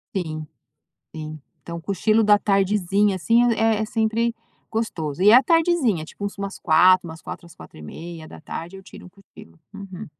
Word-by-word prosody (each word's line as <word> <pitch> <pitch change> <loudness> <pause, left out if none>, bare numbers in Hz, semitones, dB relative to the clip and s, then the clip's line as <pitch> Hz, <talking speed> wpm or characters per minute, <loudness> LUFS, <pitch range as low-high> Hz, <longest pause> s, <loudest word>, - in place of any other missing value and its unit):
Sim, 155 -4 -4 0.7
sim. 155 -1 -7 0.2
Então, 170 0 -7
o 165 - -12
cochilo 215 +4 +1
da 210 -1 +5
tardezinha, 200 0 +1
assim, 235 +6 +3
é 225 -1 +1
é - - 0
sempre 225 +2 0 0.4
gostoso. 170 -9 -3
E 200 +3 +6
é - - +8
a 255 - +8
tardezinha, 315 - +2
tipo 200 - -9
umas 200 0 -5
16h, 180 +1 +4
umas 160 0 -10
16h 170 - -9
às 170 - -16
16:30h, 165 - -9
eu 190 - -12
tiro 190 - -13
um - - -12
cochilo, 180 - -18 0.2
uhum. 195 -2 -9
195 Hz, 165 wpm, -22 LUFS, 165-220 Hz, 0.7 s, é